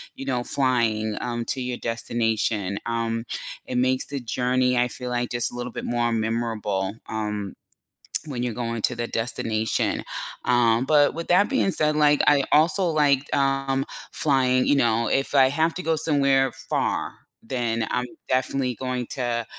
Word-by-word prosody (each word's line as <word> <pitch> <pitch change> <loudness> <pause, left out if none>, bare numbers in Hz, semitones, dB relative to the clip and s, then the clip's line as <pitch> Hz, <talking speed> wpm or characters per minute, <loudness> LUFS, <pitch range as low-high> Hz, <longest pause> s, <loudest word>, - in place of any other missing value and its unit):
you 135 - -7
know, 125 -2 -1
flying, 115 -6 0
um, 120 -1 -3
to 130 - -2
your 125 -1 -3
destination, 115 -3 -1
um, 115 -1 -1 0.4
it 125 - -3
makes 130 +1 +1
the 140 -1 -4
journey 125 +1 +1
I 125 0 +3
feel, 125 0 -6
like, 120 0 -1
just 120 -1 +1
a - - -10
little 120 0 -5
bit - - -6
more 120 0 0
memorable, 110 -3 -1
um, 105 -3 -3 0.7
when 125 -4 -3
you're 120 -2 -2
going 115 -1 -3
to 125 - +1
the 120 0 -2
destination, 110 -1 -1 0.4
um, 120 -1 +3
but 145 -1 +4
with 165 +1 -6
that 185 +6 +4
being 265 -8 +2
said, 150 -2 +2
like, 150 -1 +4
I 140 -2 +5
also 160 +6 +4
liked, 145 -4 +2
um, 135 0 +1 0.3
flying, 130 -3 +2
you 145 - +4
know, 115 -3 +2
if 135 +1 0
I 135 -2 +6
have 160 +4 +1
to 185 - -5
go 160 0 +1
somewhere 140 -4 +2
far, 135 0 -2 0.3
then 115 -2 -2
I'm 125 0 -1 0.2
definitely 130 -1 0
going 125 -1 -3
to, 120 -3 -2
125 Hz, 165 wpm, -24 LUFS, 115-135 Hz, 0.7 s, I